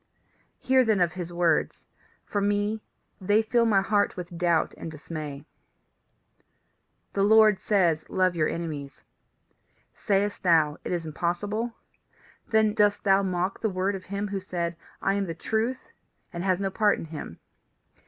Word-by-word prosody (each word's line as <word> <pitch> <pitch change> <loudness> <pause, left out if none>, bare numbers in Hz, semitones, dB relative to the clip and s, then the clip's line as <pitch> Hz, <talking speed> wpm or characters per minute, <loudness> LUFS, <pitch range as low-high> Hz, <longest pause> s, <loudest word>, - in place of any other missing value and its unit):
Hear 260 0 +3
then 220 -4 +2
of 175 -2 +2
his 175 -2 -6
words. 170 -2 0 0.4
For 205 - -2
me, 205 +2 0 0.4
they 205 +4 +3
fill 230 +1 +2
my 200 -3 +4
heart 205 -1 +1
with 175 -1 -7
doubt 170 -2 +1
and - - -7
dismay. 150 -2 -7 1.7
"The 200 - 0
Lord 215 0 +6
says: 175 -7 +1
Love 185 -1 +1
your 155 -2 +1
enemies. 150 -5 -6 0.9
Sayest 205 0 0
thou, 160 -4 +3
It - - -4
is 175 -2 -2
impossible? 205 +9 -2 0.7
Then 220 -1 +3
dost 205 -1 +2
thou 195 -1 +4
mock 185 0 -2
the 220 - +1
word 190 +1 -1
of 190 -2 -7
him 200 +1 -3
who 195 0 -2
said, 175 -2 -3 0.3
I 195 - +2
am 200 -1 -1
the 165 - -4
Truth, 225 +8 -2 0.4
and 170 0 -4
has 185 -1 +1
no 195 -1 -1
part 210 +1 +2
in - - -6
him. 155 - -8
190 Hz, 155 wpm, -26 LUFS, 170-205 Hz, 1.7 s, Lord